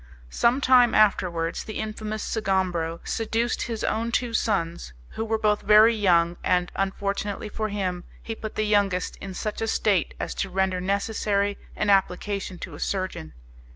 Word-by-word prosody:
Some 245 +4 +2
time 250 -3 +5
afterwards 175 -6 +2
the 215 - -6
infamous 215 0 -4
Sgombro 185 -6 -1
seduced 230 +1 -1
his 230 -2 -3
own 230 +2 -1
two 240 -1 -1
sons, 170 - -1 0.2
who - - -4
were 225 0 0
both 210 -1 +1
very 215 +2 +6
young, 175 -5 +2
and, 180 -1 +1
unfortunately 200 +2 -2
for 215 +1 -3
him, 185 -3 -2 0.2
he 225 - -4
put 220 -1 -7
the 215 - 0
youngest 200 -3 +1
in 195 -1 -8
such 215 +3 -4
a 225 - 0
state 200 -5 +1
as - - -3
to 195 - -2
render 190 0 0
necessary 200 +1 0 0.2
an 210 - +1
application 195 0 0
to 175 -2 -8
a 145 - -9
surgeon. 185 - -3
200 Hz, 160 wpm, -25 LUFS, 185-215 Hz, 0.2 s, very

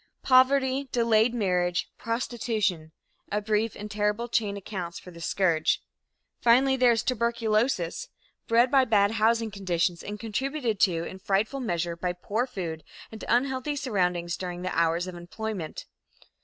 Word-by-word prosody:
Poverty, 265 +1 +4
delayed 230 -1 +3
marriage, 180 -6 0
prostitution 220 -8 -2 0.4
a 210 - +1
brief 215 +1 0
and 210 0 -7
terrible 210 +3 0
chain 210 -4 0
accounts 185 -4 -6
for 180 - -11
this 170 -1 -6
scourge. 170 -5 +2 0.6
Finally, 260 +3 +5
there 250 -2 +5
is 230 0 +1
tuberculosis, 230 -5 0 0.4
bred 235 +2 +4
by 270 -1 +6
bad 205 -4 +3
housing 225 0 +2
conditions 175 -3 -1
and 210 0 -6
contributed 235 0 -2
to 170 -4 +2
in 190 +2 -7
frightful 205 +8 0
measure 175 -8 -2
by 175 +1 -2
poor 215 +7 -2
food 170 -9 -5 0.3
and 220 - -9
unhealthy 265 +3 +1
surroundings 180 -10 -1
during 180 -1 -5
the 185 - -3
hours 170 +1 +2
of 185 - -7
employment. 175 0 -6
210 Hz, 140 wpm, -27 LUFS, 180-235 Hz, 0.6 s, by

